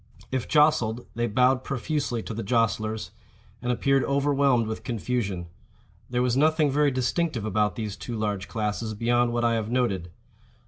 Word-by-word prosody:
If 130 -2 -2
jostled, 125 -7 +3
they 120 0 -1
bowed 125 +4 +3
profusely 135 -3 -2
to - - -6
the 115 - -4
jostlers, 110 -1 0 0.5
and 125 - -1
appeared 135 +2 +2
overwhelmed 140 -3 +2
with 110 0 -5
confusion.—There 115 +1 -4
was 125 -1 +1
nothing 155 +1 +3
very 145 +1 +3
distinctive 130 - -1
about 105 -2 +1
these 105 -3 -4
two 120 - -6
large 105 -3 -2
classes 110 0 -2
beyond 120 +2 +2
what 120 0 0
I 115 - +3
have 110 -1 -1
noted. 100 -8 0
120 Hz, 150 wpm, -26 LUFS, 110-130 Hz, 0.5 s, jostled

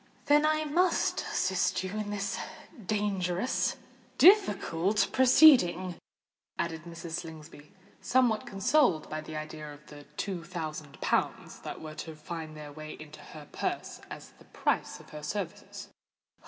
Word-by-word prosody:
"Then 295 +1 +5
I 310 0 +2
must 345 +5 +1
assist - - 0
you 185 - -4
in 210 0 -3
this 205 -1 -2 0.5
dangerous—difficult 205 - +2
proceeding," 245 - +6 0.6
added 165 -1 -3
Mrs. 170 0 -8
Slingsby, 155 -2 -11 0.3
somewhat 245 -4 +2
consoled 195 - +2
by 155 0 -3
the 155 0 -8
idea 155 0 -6
of 145 +1 -14
the 145 -1 -12
two 185 -4 -3
thousand 155 -4 -6
pounds - - -1
that - - -7
were 155 -1 -7
to 160 +1 -7
find 155 0 -7
their 150 -1 -8
way 155 +1 -8
into 155 0 -11
her 150 0 -11
purse - - -3
as - - -9
the - - -17
price - - -1
of - - -16
her 150 - -8
services. 175 +3 -5
175 Hz, 135 wpm, -30 LUFS, 155-210 Hz, 0.6 s, proceeding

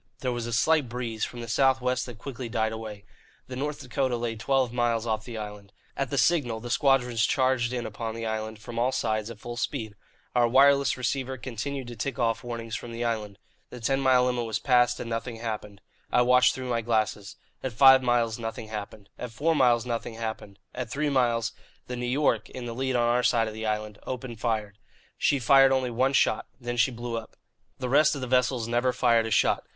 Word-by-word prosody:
There 125 - -1
was 120 -1 -3
a - - -4
slight 145 +3 +2
breeze 115 -2 -3
from 120 - -8
the 115 - -6
south 130 +3 +3
west 125 0 -1
that 120 -3 -9
quickly 125 -1 -6
died 110 -1 0
away. 110 -2 -7 0.4
The 130 - -8
North 145 +3 -3
Dakota 130 -3 -1
lay 115 -1 -3
twelve 130 +1 0
miles 120 -2 +1
off 110 -1 -2
the 120 -2 -7
island. 105 -2 -8 0.2
At 135 -2 -2
the 140 - -2
signal 125 -6 +2
the 120 +1 -7
squadrons 125 -5 +2
charged 130 -1 +2
in 120 -2 -3
upon 110 +1 -5
the 115 0 -4
island, 110 0 -3
from 115 +2 -6
all 125 +2 +2
sides, 110 -3 -1
at 115 - -8
full 120 0 -7
speed. 115 -4 -3 0.4
Our 120 -1 +4
wireless 140 +1 +4
receiver 130 +1 -2
continued 130 +2 -5
to 120 0 -8
tick 135 +5 -3
off 115 -2 0
warnings 115 -2 -5
from 120 - -6
the 115 +1 -4
island. 105 -4 -3 0.3
The 125 - -9
ten 135 +4 0
mile 130 -2 +4
limit 125 -1 0
was 110 -2 -1
passed, 125 0 +3
and - - -5
nothing 115 +1 -3
happened. 105 -3 -6 0.3
I 125 - +4
watched 125 +1 +5
through 130 -1 -4
my 115 -1 +1
glasses. 110 -3 -1 0.3
At 130 - -3
five 130 +3 +7
miles 120 -2 +1
nothing 115 -1 -5
happened; 105 -1 -7
at 125 - -5
four 155 +9 0
miles 120 -4 +3
nothing 115 -1 -3
happened; 110 -3 -6 0.2
at - - -5
three 145 +4 -1
miles, 120 -4 +1 0.3
the 125 - -5
New 125 0 -3
York, 140 +4 +1
in 125 -1 -7
the 120 - -4
lead 130 +1 -1
on 120 -1 +3
our 120 +1 +3
side 115 -2 +2
of 110 - -5
the 110 0 -4
island, 105 -1 -3
opened 125 -3 -5
fire. 110 -3 -1 0.5
She 140 - +3
fired 135 +1 +6
only 130 -2 +1
one 130 +4 +1
shot. - - +2
Then 120 -1 -4
she 120 - +3
blew 120 -1 -5
up. 110 - -14 0.4
The 130 - -3
rest 150 +4 +4
of 140 - -5
the - - -2
vessels 125 -2 +1
never 120 +2 +1
fired 115 -2 +3
a - - -5
shot. - - +2
120 Hz, 220 wpm, -27 LUFS, 115-130 Hz, 0.5 s, five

